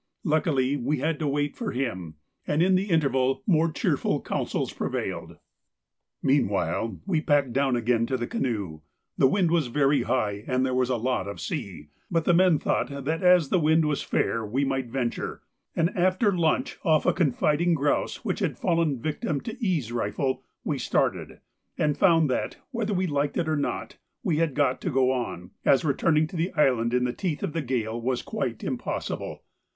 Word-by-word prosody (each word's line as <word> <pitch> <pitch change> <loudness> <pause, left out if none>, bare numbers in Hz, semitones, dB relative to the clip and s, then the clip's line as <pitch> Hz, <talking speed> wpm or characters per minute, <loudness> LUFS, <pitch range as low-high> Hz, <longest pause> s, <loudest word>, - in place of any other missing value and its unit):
Luckily 150 - +1
we 140 +4 -1
had 150 +3 -1
to 155 - -1
wait 145 +1 -1
for 230 -4 -4
him, 95 -12 -3 0.3
and 150 +3 +2
in 190 +1 +3
the 190 +2 +1
interval 135 -5 +1
more 165 -3 +3
cheerful 150 - 0
counsels - - -2
prevailed. - - -4 0.9
Meanwhile 110 - +1
we 175 -6 +1
packed 145 -6 +2
down 135 -1 +2
again 115 -1 +1
to 130 - -1
the 120 - -2
canoe; 100 - -3 0.3
the - - +5
wind 175 +3 +2
was 165 -6 +2
very 140 +3 +2
high 105 -5 -1
and 130 0 +1
there 130 - -1
was 125 0 +1
a 130 - +1
lot 120 -4 -1
of 100 - -6
sea, 100 - -5 0.2
but 165 -2 0
the 175 - +4
men 180 -2 +5
thought - - 0 0.2
that 160 +2 -1
as 180 -5 +5
the 185 - +3
wind 160 0 +3
was 150 -2 0
fair 115 - 0
we 125 +7 0
might 135 -2 -1
venture, 120 -1 -3 0.3
and 170 +3 +1
after 185 +2 +2
lunch 165 -3 0
off 155 -2 +3
a - - +4
confiding 160 +2 +2
grouse 145 -1 -1
which - - -1
had - - -1
fallen 165 -3 +1
a - - -3
victim 150 +2 -2
to 225 - -6
E.'s 160 - 0
rifle, 130 +3 -1 0.2
we - - -2
started, - - -1 0.4
and 150 -1 +1
found 165 -4 +4
that, 130 - -2
whether 220 -5 -1
we 185 +1 +1
liked 145 -3 -1
it 165 - 0
or 155 - +1
not, 145 - -3 0.3
we 175 -9 +1
had 160 -4 0
got 140 -3 +1
to - - -1
go 130 -3 +3
on, 120 -9 -4
as 135 +2 +4
returning 155 +2 +2
to 160 - -9
the 170 +3 -1
island 125 -7 +2
in 125 0 +2
the 125 -1 -1
teeth 175 -7 -3
of 150 - -2
the 165 - -1
gale 120 -4 -2
was 125 +1 -1
quite - - -3
impossible. - - -4
145 Hz, 190 wpm, -26 LUFS, 125-165 Hz, 0.9 s, the